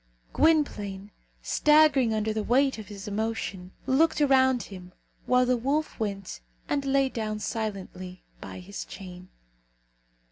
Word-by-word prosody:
Gwynplaine, 210 -11 +1 0.3
staggering 290 - +4
under 215 0 0
the 215 - -1
weight 265 +2 +2
of 210 - -9
his 200 -1 -9
emotion, 205 -3 -3
looked 310 +5 +3
around 260 -3 +4
him, 180 -2 -11 0.3
while 250 0 +4
the 250 0 +2
wolf 280 +6 -1
went 200 -3 -4 0.3
and 285 -1 0
lay 275 0 +2
down 215 -4 -3
silently 195 -4 -5 0.2
by - - -8
his 200 +3 -7
chain. 185 -1 -10
220 Hz, 130 wpm, -27 LUFS, 195-270 Hz, 0.3 s, staggering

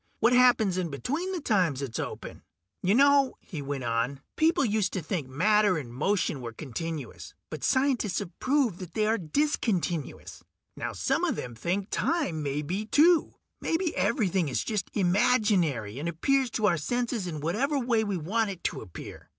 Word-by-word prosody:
What 230 +2 +4
happens 240 -7 +4
in 175 -2 -2
between 285 - -3
the 370 - -2
times 180 - +1
it's 120 -4 -4
open? - - -6 0.4
"You 190 +3 +2
know," 280 0 +5
he 160 -7 -7
went 140 -1 -4
on, 120 +4 -1
"people 320 -2 +3
used 210 -3 0
to 185 - -2
think 160 -4 -3
matter 205 +7 +3
and 125 -6 -6
motion 155 0 0
were 115 -1 -6
continuous, 155 +4 -6 0.2
but - - -6
scientists 260 -7 +1
have 195 -4 -3
proved 255 -9 +1
that 180 -3 -9
they 215 - +2
are 220 +1 +1
discontinuous. 180 - -1 0.3
Now - - -4
some - - 0
of - - +1
them 120 - -5
think 185 - -2
time 285 - 0
may 145 +1 -2
be, 195 +8 -3
too. 325 +6 +4 0.3
Maybe 335 0 -1
everything 190 - +1
is 130 - -1
just 210 -5 -2
imaginary, 180 - +2
and 165 +4 -2
appears 265 - +1
to 215 - 0
our 175 -4 +3
senses 235 +3 -2
in 155 -3 -4
whatever 230 - 0
way 240 -4 +1
we 200 -3 -2
want 210 +7 0
it 190 -3 -7
to - - -2
appear. 90 -6 -10
195 Hz, 175 wpm, -28 LUFS, 155-245 Hz, 0.4 s, know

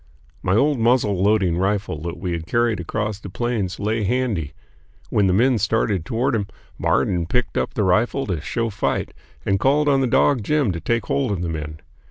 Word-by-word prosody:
My 95 - +1
old 140 +3 +2
muzzle 115 -5 +2
loading 95 -4 +2
rifle 95 -5 -1
that 85 +1 -5
we 90 0 -4
had 85 -1 -4
carried 120 0 +1
across 105 +4 -3
the 100 - -8
Plains 110 -3 -2
lay 110 +2 -1
handy. 105 - -1 0.6
When 100 -2 +3
the - - +3
men 120 +4 +3
started 105 -4 0
toward 120 +6 0
him, 105 -3 -1 0.3
Marden 85 -2 +1
picked 125 +5 -1
up - - -1
the 105 - +1
rifle 110 +9 +2
to 90 -6 -2
show 115 +7 -2
fight - - -2 0.3
and 95 0 +1
called 145 +5 +2
on 135 -2 +3
the 130 - +2
dog 130 +1 +3
Jim 145 -4 +1
to 85 - -4
take 115 +6 -1
hold 135 -5 0
of 90 -3 -2
the 85 - -2
men. 75 -1 -5
105 Hz, 200 wpm, -22 LUFS, 90-120 Hz, 0.6 s, When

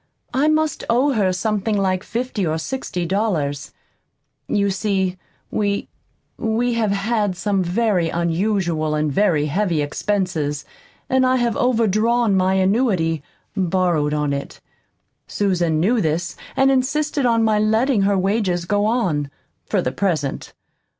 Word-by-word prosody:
I 280 +3 +2
must 310 -1 +1
owe 255 +5 +3
her 200 -5 +2
something 210 +2 -1
like 185 -2 0
fifty 235 -3 -3
or 160 -2 0
sixty 180 -3 -4
dollars. 160 -8 -1 0.8
You 200 -1 +1
see, 190 -2 -1 0.3
we 205 -1 -1 0.5
we 235 +2 0
have 225 -2 +1
had 200 -1 0
some 200 0 0
very 180 -2 +1
unusual 170 -2 0
and 150 -1 0
very 165 -5 +2
heavy 170 +1 0
expenses, 150 -3 -2 0.4
and 260 0 +2
I 255 0 +3
have 240 -3 +1
overdrawn 230 -2 +2
my 190 0 +2
annuity 190 - +1 0.3
borrowed 180 -5 +1
on 150 -1 0
it. 140 0 -5 0.7
Susan 175 -6 0
knew 220 +7 +2
this 165 +2 -1 0.2
and 270 0 +4
insisted 280 +1 +1
on 230 -1 +3
my 215 -1 +2
letting 220 +2 +2
her 200 0 +2
wages 190 -2 0
go 205 +3 +1
on, 180 - 0 0.4
for - - 0
the 125 - -1
present. 155 -6 -2
200 Hz, 135 wpm, -21 LUFS, 170-225 Hz, 0.8 s, and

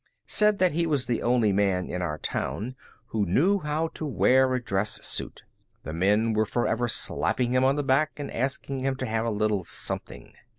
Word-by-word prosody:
said 210 -1 +3
that 185 -2 +3
he 170 +2 0
was 145 -5 0
the 120 - -1
only 120 -4 +2
man 95 -2 +1
in 90 - -4
our 75 -4 -2
town 120 +10 -3 0.3
who 110 -2 0
knew 165 - +3
how 150 0 -1
to - - -8
wear 130 -2 +3
a - - 0
dress 105 -3 -1
suit. - - -4 0.4
The 80 - -6
men 105 +6 +2
were 110 0 +1
forever 120 +1 0
slapping 125 +1 0
him 130 0 +3
on 135 +1 +3
the 145 - -1
back 140 +3 +3
and 145 - -5
asking 135 +2 -2
him 135 +1 -1
to 130 - -4
have 115 -1 -1
a - - +1
little 105 -2 0
something. - - -5
125 Hz, 200 wpm, -26 LUFS, 105-140 Hz, 0.4 s, said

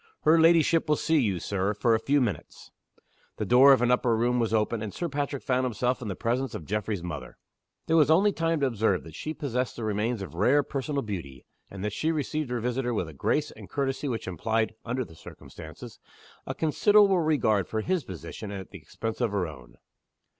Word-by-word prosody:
"Her 160 +2 +5
ladyship 165 -1 +4
will 150 - +4
see 160 +1 +2
you, 100 -9 0
Sir, 100 +3 -1
for 115 +2 +2
a 110 - +3
few 140 +5 +2
minutes." 115 -6 -4 0.7
The 105 - -2
door 130 +6 +7
of 130 -3 +5
an 125 - +3
upper 125 -2 +2
room 120 +2 +1
was 115 -2 0
opened; 110 0 0
and 110 -2 -4
Sir 175 - -3
Patrick 140 -2 -3
found 130 0 +1
himself 125 +1 -1
in 115 - -5
the 95 - -3
presence 125 +4 -1
of 80 - -7
Geoffrey's 105 -1 -2
mother. 75 -7 -7 0.5
There 165 - +1
was 150 -2 +5
only 190 +6 +5
time 165 -3 -1
to - - +3
observe 110 -6 +1
that 80 - -12
she 155 - -5
possessed 130 -4 -2
the 120 - -6
remains 110 +1 -1
of 85 - -9
rare 125 +12 +3
personal 140 +1 -3
beauty, 80 - -7 0.2
and 100 +1 -6
that 105 - -2
she 160 +8 0
received 155 -2 -2
her 125 -1 -2
visitor 125 +1 -1
with 90 -6 -2
a - - -11
grace 150 - 0
and - - -13
courtesy 140 0 -2
which 115 -6 -4
implied 110 +5 -1
(under 125 +1 -2
the 80 - -15
circumstances) 80 -1 -11 0.5
a - - -3
considerate 195 +3 +4
regard 110 -10 +2
for 110 - -2
his 180 +4 -1
position 95 +3 -8
at 95 -2 -7
the - - -9
expense 115 +2 -5
of 120 - +2
her 100 -3 0
own. 65 -6 -11
120 Hz, 210 wpm, -27 LUFS, 105-145 Hz, 0.7 s, door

